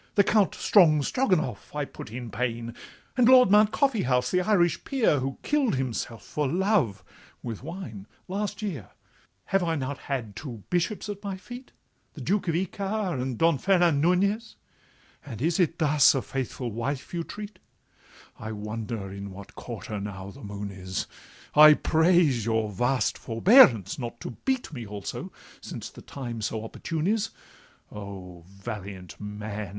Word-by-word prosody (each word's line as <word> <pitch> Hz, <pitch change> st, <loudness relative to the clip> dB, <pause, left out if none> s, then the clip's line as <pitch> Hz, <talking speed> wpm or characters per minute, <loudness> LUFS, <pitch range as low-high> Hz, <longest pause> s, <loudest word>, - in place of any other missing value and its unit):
The 200 Hz, -, +6 dB
Count 210 Hz, -1 st, +3 dB
Strongstroganoff 175 Hz, -, +2 dB
I 145 Hz, -1 st, -1 dB
put -, -, -10 dB
in 120 Hz, -1 st, -6 dB
pain, 115 Hz, 0 st, -3 dB, 0.4 s
And 250 Hz, -2 st, +5 dB
Lord 255 Hz, -5 st, +7 dB
Mount 210 Hz, +1 st, +6 dB
Coffeehouse, 130 Hz, -, +1 dB
the 180 Hz, -, +3 dB
Irish 180 Hz, -3 st, +2 dB
peer, 235 Hz, -, +2 dB
Who 135 Hz, +1 st, -3 dB
kill'd 290 Hz, -, +2 dB
himself 120 Hz, -3 st, -3 dB
for 150 Hz, -2 st, -1 dB
love 170 Hz, -, +1 dB, 0.4 s
(with 115 Hz, -4 st, -5 dB
wine) 130 Hz, -, -7 dB, 0.2 s
last 205 Hz, +3 st, -3 dB
year. 155 Hz, -, -4 dB, 0.6 s
'Have 195 Hz, -, +1 dB
I 165 Hz, -2 st, 0 dB
not 140 Hz, -1 st, -3 dB
had 120 Hz, -7 st, -4 dB
two 120 Hz, -9 st, -7 dB
bishops 180 Hz, +5 st, 0 dB
at 205 Hz, 0 st, -6 dB
my 195 Hz, -2 st, -4 dB
feet, 245 Hz, +7 st, -10 dB, 0.4 s
The -, -, -8 dB
Duke 205 Hz, 0 st, 0 dB
of 165 Hz, -, +1 dB
Ichar, 190 Hz, -2 st, -2 dB
and 130 Hz, -2 st, -3 dB
Don 165 Hz, -1 st, +3 dB
Fernan 175 Hz, -6 st, +3 dB
Nunez? 200 Hz, +7 st, +1 dB, 0.7 s
And 125 Hz, -7 st, -8 dB
is 165 Hz, +7 st, +1 dB
it 170 Hz, -2 st, +2 dB
thus 150 Hz, -4 st, +5 dB
a 135 Hz, -, 0 dB
faithful 130 Hz, -2 st, -4 dB
wife 130 Hz, +8 st, -4 dB
you 170 Hz, -1 st, -1 dB
treat? 205 Hz, +1 st, -8 dB, 0.8 s
I 110 Hz, -1 st, -5 dB
wonder 105 Hz, -1 st, -5 dB
in 100 Hz, 0 st, -6 dB
what 95 Hz, +1 st, -11 dB
quarter 105 Hz, -, -6 dB
now 100 Hz, -1 st, -6 dB
the -, -, -14 dB
moon 100 Hz, 0 st, -5 dB
is: 95 Hz, -1 st, -4 dB, 0.5 s
I 150 Hz, 0 st, +9 dB
praise 160 Hz, -, +3 dB
your 110 Hz, -1 st, 0 dB
vast 125 Hz, +3 st, 0 dB
forbearance 115 Hz, -, +5 dB
not 120 Hz, -1 st, -5 dB
to -, -, -5 dB
beat 260 Hz, -10 st, -1 dB
Me 120 Hz, -4 st, -5 dB
also, 105 Hz, -2 st, -6 dB, 0.3 s
since -, -, -7 dB
the -, -, -12 dB
time 120 Hz, -5 st, -6 dB
so 110 Hz, +1 st, -2 dB
opportune 160 Hz, +7 st, -4 dB
is— 220 Hz, +2 st, +1 dB, 0.6 s
O, 95 Hz, -4 st, -9 dB
valiant 100 Hz, -2 st, -8 dB
man! 105 Hz, 0 st, -5 dB
135 Hz, 155 wpm, -27 LUFS, -, 0.8 s, I